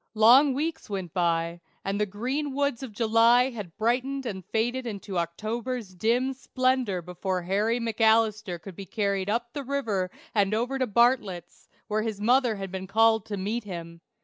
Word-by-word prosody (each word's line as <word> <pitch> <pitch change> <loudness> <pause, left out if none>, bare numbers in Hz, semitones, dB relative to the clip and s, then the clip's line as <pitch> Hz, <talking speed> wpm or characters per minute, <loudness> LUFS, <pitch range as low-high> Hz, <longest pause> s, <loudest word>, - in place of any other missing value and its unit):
Long 255 +6 +6
weeks 315 -1 -3
went 190 -5 -4
by, 170 -1 0 0.2
and 200 +1 -1
the 210 - +1
green 260 +8 -3
woods 280 -3 0
of 265 -4 -6
July 230 +3 +4
had 205 -8 -8
brightened 255 +4 0
and 190 -5 -4
faded 240 +6 -1
into 200 -4 -4
October's 215 +5 -4
dim 240 +8 +1
splendor 255 -7 0
before 180 +1 -3
Harry 210 +6 +1
McAlister 220 -4 +2
could 190 +1 -10
be 195 0 -8
carried 200 -2 -1
up 235 +2 -1
the 285 - -4
river 230 -9 -1 0.2
and 205 -1 +2
over 250 +4 -1
to 255 - +1
Bartlett's, 215 -5 +1 0.2
where 215 0 0
his 215 -2 -3
mother 245 +1 +3
had 195 -2 -6
been 190 0 -5
called 220 +1 +3
to 205 -2 -4
meet 210 +5 -2
him. 170 -4 -8
220 Hz, 170 wpm, -27 LUFS, 195-245 Hz, 0.2 s, Long